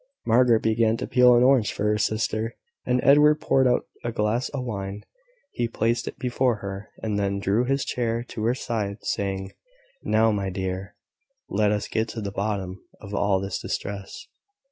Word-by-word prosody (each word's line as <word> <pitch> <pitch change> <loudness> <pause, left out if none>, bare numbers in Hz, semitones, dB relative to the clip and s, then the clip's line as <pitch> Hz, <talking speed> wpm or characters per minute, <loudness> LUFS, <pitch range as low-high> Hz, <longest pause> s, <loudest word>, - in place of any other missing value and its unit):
Margaret 120 -1 +4
began 110 0 +2
to - - -3
peel 125 -1 +5
an 120 - +5
orange 125 -6 +4
for - - -4
her 105 0 +2
sister, 110 +1 -1 0.3
and 125 - +2
Edward 150 +2 +6
poured 135 -3 +3
out 125 - +2 0.2
a 120 - -2
glass 110 +2 0
of 140 -3 -4
wine; 100 -3 -5 0.5
he 120 -2 -1
placed 115 +1 -1
it - - -6
before 125 -1 +1
her, 100 0 -7
and 105 -2 -1
then 100 0 0
drew 100 +5 +1
his 135 +2 0
chair 115 -1 -1
to 110 - -5
her 120 +2 +2
side, 105 -5 -3
saying 95 -1 -2 0.5
"Now, 110 +1 +3
my 100 -2 -1
dear, 95 +1 -4 0.5
let 105 +1 +2
us 105 -1 -1
get 110 +1 -1
to 115 - -5
the 100 -1 -4
bottom 100 -2 -3 0.2
of 100 -1 -10
all 100 -1 +2
this 95 0 -4
distress." 100 -1 -5
110 Hz, 180 wpm, -25 LUFS, 100-120 Hz, 0.5 s, Edward